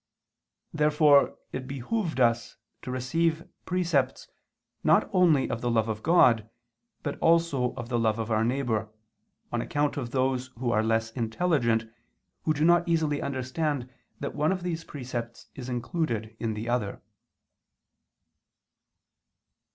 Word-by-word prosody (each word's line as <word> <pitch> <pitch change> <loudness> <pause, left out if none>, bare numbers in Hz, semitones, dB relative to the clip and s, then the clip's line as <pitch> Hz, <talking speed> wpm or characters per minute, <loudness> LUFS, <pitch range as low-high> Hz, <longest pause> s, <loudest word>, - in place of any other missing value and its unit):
Therefore 150 -1 +4
it 130 0 -5
behooved 155 - -2
us 120 -2 +2 0.2
to - - -7
receive 160 +7 0 0.2
precepts 165 -8 0 0.6
not - - +4
only 165 -7 +4
of 120 -2 -3
the 120 - 0
love 115 -2 +2
of 110 -1 -3
God 115 -9 +4 0.5
but 145 - -4
also 165 -7 +2
of 120 -2 -6
the 120 -2 +1
love 110 -1 +1
of 115 0 -3
our 110 0 +2
neighbor, 115 -3 0 0.6
on 120 - 0
account 145 -1 -1
of 125 -4 -3
those 130 0 0
who 120 0 -1
are 110 - +3
less 110 0 0
intelligent, 115 -1 +1 0.6
who 155 - +3
do 150 +2 +2
not 175 0 +4
easily 155 -3 +1
understand 130 0 -2 0.3
that 140 - -4
one 150 +4 +1
of 185 -2 -2
these 165 -2 -3
precepts 120 -5 -6
is 130 -1 -7
included 120 -4 -2
in 110 -2 -2
the 110 +2 -5
other. 120 -5 -2
130 Hz, 135 wpm, -27 LUFS, 115-155 Hz, 0.6 s, Therefore